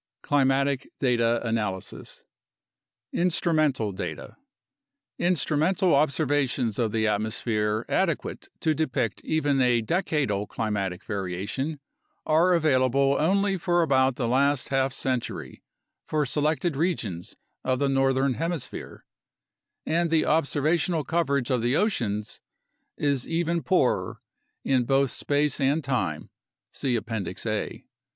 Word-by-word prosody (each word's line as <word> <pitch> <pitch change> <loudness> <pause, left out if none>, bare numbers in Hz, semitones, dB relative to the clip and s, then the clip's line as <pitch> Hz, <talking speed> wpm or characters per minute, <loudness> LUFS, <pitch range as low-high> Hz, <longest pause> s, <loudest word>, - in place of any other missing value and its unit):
Climatic 140 -1 +1
Data 120 -3 +1
Analysis 105 -4 -4 0.9
Instrumental 155 - +1
Data 95 +1 -6 0.8
Instrumental 175 +2 +2
observations 140 -5 +1
of 115 -3 +1
the 110 0 +1
atmosphere 105 +1 -1
ade 175 -5 +2
quate - - -9
to 160 - +2
depict 130 -9 -1
even 145 -4 +1
a 120 -2 +3
decadal 140 - 0
climatic 100 -5 -3
variation 100 - -3 0.5
are 170 +4 +4
available 140 -3 +3
only 195 +4 +2
for 175 0 +2
about 130 -4 +3
the 120 -2 -1
last 140 +2 +2
half 135 0 +1
century 130 -2 -3 0.5
for 150 -1 0
selected 150 +3 0
regions 115 - -2 0.3
of 130 0 +1
the 140 +1 +1
northern 135 0 +2
hemisphere, 165 0 -5 0.8
and 170 +1 +1
the 160 -1 +3
observational 155 +2 +1
coverage 140 -6 0
of 125 -2 +1
the 120 +3 +1
oceans 110 - -1 0.6
is 140 -3 0
even 170 0 0
poorer 170 -10 +1 0.4
in 130 -2 +2
both 135 +1 +2
space 145 0 0
and 140 +4 +2
time 95 - -2 0.4
(see 130 -3 -1
Appendix 105 -5 -4
A). 110 -1 -3
135 Hz, 115 wpm, -26 LUFS, 115-155 Hz, 0.9 s, are